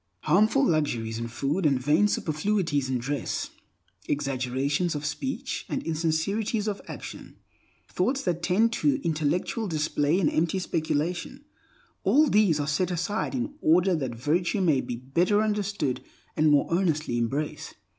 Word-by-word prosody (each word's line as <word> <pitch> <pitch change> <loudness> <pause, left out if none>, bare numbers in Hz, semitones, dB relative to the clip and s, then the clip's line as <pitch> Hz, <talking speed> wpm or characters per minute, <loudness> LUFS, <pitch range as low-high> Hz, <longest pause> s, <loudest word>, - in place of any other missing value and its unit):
Harmful 220 +8 +3
luxuries 120 - 0
in 115 - -3
food 140 +10 -2
and 140 -4 +3
vain 150 +10 +3
superfluities 155 -6 0
in 130 - +1
dress; 135 +4 -3 0.6
exaggerations 140 +4 -1
of 145 0 -4
speech 265 - -3
and - - -2
insincerities 175 +7 -1
of 205 -1 -2
action; - - -9 0.5
thoughts 260 +9 0
that 175 -2 -1
tend 215 +7 +2
to 285 +4 +1
intellectual 165 +7 0
display 155 0 +1
and 165 - +2
empty 165 +3 +1
speculation—all 180 - -1
these 200 -8 +4
are 145 - 0
set 150 +5 0
aside 180 +7 -2
in 260 +3 -2
order 180 +4 +4
that 130 -7 -3
virtue 170 - 0
may 155 -8 +3
be 120 - -5
better 170 - +1
understood 205 - -1 0.3
and 155 0 +3
more 145 -1 +4
earnestly 155 -9 +1
embraced. 140 +6 -3
165 Hz, 135 wpm, -27 LUFS, 145-200 Hz, 0.6 s, these